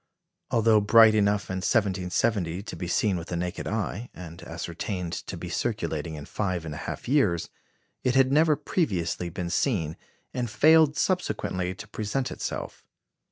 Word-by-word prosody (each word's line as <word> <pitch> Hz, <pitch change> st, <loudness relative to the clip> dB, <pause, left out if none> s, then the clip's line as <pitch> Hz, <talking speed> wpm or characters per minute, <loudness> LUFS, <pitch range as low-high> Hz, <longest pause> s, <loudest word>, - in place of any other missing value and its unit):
Although 115 Hz, -2 st, +4 dB
bright 110 Hz, +1 st, +7 dB
enough 105 Hz, -2 st, +1 dB
in 95 Hz, -, -2 dB
1770 95 Hz, -1 st, 0 dB
to -, -, -7 dB
be 90 Hz, -, -5 dB
seen 95 Hz, +2 st, +1 dB
with 85 Hz, 0 st, -6 dB
the 90 Hz, -, -3 dB
naked 90 Hz, 0 st, -3 dB
eye, 110 Hz, +2 st, -3 dB
and 85 Hz, -2 st, -9 dB
ascertained 85 Hz, +2 st, -4 dB
to -, -, -5 dB
be -, -, -6 dB
circulating 80 Hz, +1 st, -2 dB
in 75 Hz, -2 st, -8 dB
five 90 Hz, -5 st, -2 dB
and 80 Hz, -, -5 dB
a -, -, -6 dB
half -, -, -6 dB
years, 110 Hz, -, +2 dB, 0.5 s
it 125 Hz, 0 st, +1 dB
had 135 Hz, 0 st, +5 dB
never 155 Hz, +1 st, +5 dB
previously 95 Hz, -, -1 dB
been 85 Hz, 0 st, -4 dB
seen, 85 Hz, -, 0 dB, 0.4 s
and 125 Hz, -2 st, -2 dB
failed 155 Hz, +4 st, +5 dB
subsequently 95 Hz, -, -1 dB
to 105 Hz, -, -9 dB
present 110 Hz, +5 st, -2 dB
itself. -, -, -5 dB
100 Hz, 160 wpm, -27 LUFS, 85-115 Hz, 0.5 s, bright